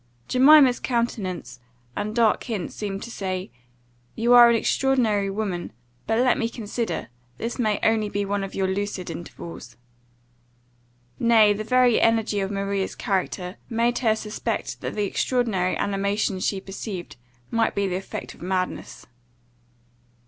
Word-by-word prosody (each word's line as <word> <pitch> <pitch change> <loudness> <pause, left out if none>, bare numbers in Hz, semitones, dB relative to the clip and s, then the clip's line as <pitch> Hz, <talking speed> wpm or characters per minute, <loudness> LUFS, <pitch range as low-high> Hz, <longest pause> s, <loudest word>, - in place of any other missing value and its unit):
Jemima's 265 -1 +6
countenance, 205 - -2 0.4
and 215 +1 -3
dark 230 -3 +3
hints, 215 -8 -4
seemed 200 -1 -4
to 235 - -8
say, 185 - -4 0.6
"You 235 +2 +3
are 240 -1 +9
an 235 - +4
extraordinary 230 -5 +1
woman; 195 -4 -3 0.4
but 225 - +1
let 250 +1 +3
me 230 - 0
consider, 230 - -4 0.3
this 235 +3 -4
may 215 -4 +1
only 220 -2 +2
be 205 0 -2
one 200 0 -1
of 195 - -6
your 190 - 0
lucid 190 -2 -3
intervals." 165 -7 -9 1.4
Nay, 220 -3 +5
the 210 +1 -4
very 250 +1 +3
energy 225 -2 +2
of 195 -1 -1
Maria's 195 -1 -2
character, 185 -1 -2
made 235 +1 +1
her 225 -3 +2
suspect 215 -1 -4
that - - -4
the 210 -1 0
extraordinary 200 -4 0
animation 200 0 -1
she 195 +1 -1
perceived 195 -1 -7 0.4
might 230 -1 +1
be 200 - +1
the 180 - -2
effect 190 - -7
of - - -19
madness. 185 +1 -3
210 Hz, 140 wpm, -24 LUFS, 195-230 Hz, 1.4 s, are